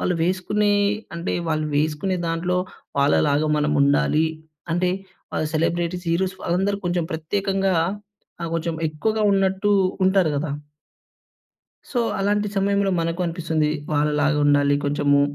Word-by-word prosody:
వాళ్ళు 180 - 0
వేసుకునే 190 +4 +1 0.4
అంటే 170 +1 -3 0.2
వాళ్ళు 155 -1 0
వేసుకునే 155 +5 0
దాంట్లో 175 +2 -1 0.4
వాళ్ళలాగా 145 +1 +3
మనం 150 0 +1
ఉండాలి, 145 +3 +3 0.5
అంటే, 180 +1 +1 0.4
ఆ - - -1 0.2
సెలబ్రిటీస్, 170 +2 -1
హీరోస్ 185 +2 0
వాళ్ళందరూ 195 +3 0
కొంచెం 175 -1 0
ప్రత్యేకంగా 195 +3 0 0.7
ఆహ్, 170 - -3
కొంచెం 165 0 -1
ఎక్కువగా 215 +8 -1
ఉన్నట్టు 195 +1 +1 0.4
ఉంటారు 190 -4 +3
గదా! 145 +1 -2 1.4
సో, 245 - -1 0.2
అలాంటి 205 +1 +1
సమయంలో 200 0 +2
మనకు 165 +2 -2
అనిపిస్తుంది. 165 -3 0 0.2
వాళ్ళలాగా 150 0 +2
ఉండాలి 145 0 +4
కొంచెము, 145 0 +2
170 Hz, 115 wpm, -23 LUFS, 150-190 Hz, 1.4 s, ఉండాలి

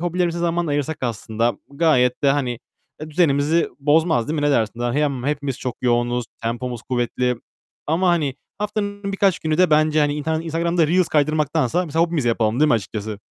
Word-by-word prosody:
hobilerimize 175 0 -1
zaman 170 0 0
ayırsak 145 +1 -1
aslında 115 -1 -1 0.2
gayet 140 -5 +2
de, 140 - +4
hani, 130 -4 -1 0.4
eee, 155 0 -7
düzenimizi 155 0 +2
bozmaz, 150 -3 +2
değil 160 - -1
mi - - -2
ne - - +3
dersin? 115 -3 0
Dahi 120 +3 0
yam 140 -4 -1
hepimiz 140 -2 -2
çok 125 -4 -4
yoğunuz, 120 0 +1 0.2
tempomuz 120 +1 -3
kuvvetli 125 0 -1 0.5
ama, 170 +5 +1
hani, 155 -6 +1 0.2
haftanın 205 -1 -3
birkaç 195 -2 +2
günü 155 -1 -1
de 185 -2 +4
bence, 155 0 +3
hani, 145 -1 +2
intar 160 +2 -1
Instagram'da 165 0 0
reels 180 +2 +2
kaydırmaktansa 155 +1 +1
mesela 160 +2 +1
hobimizi 160 -8 -1
yapalım, 115 +1 +1
değil 155 - +5
mi - - +4
açıkçası? 110 -1 -4
150 Hz, 175 wpm, -21 LUFS, 125-165 Hz, 0.5 s, değil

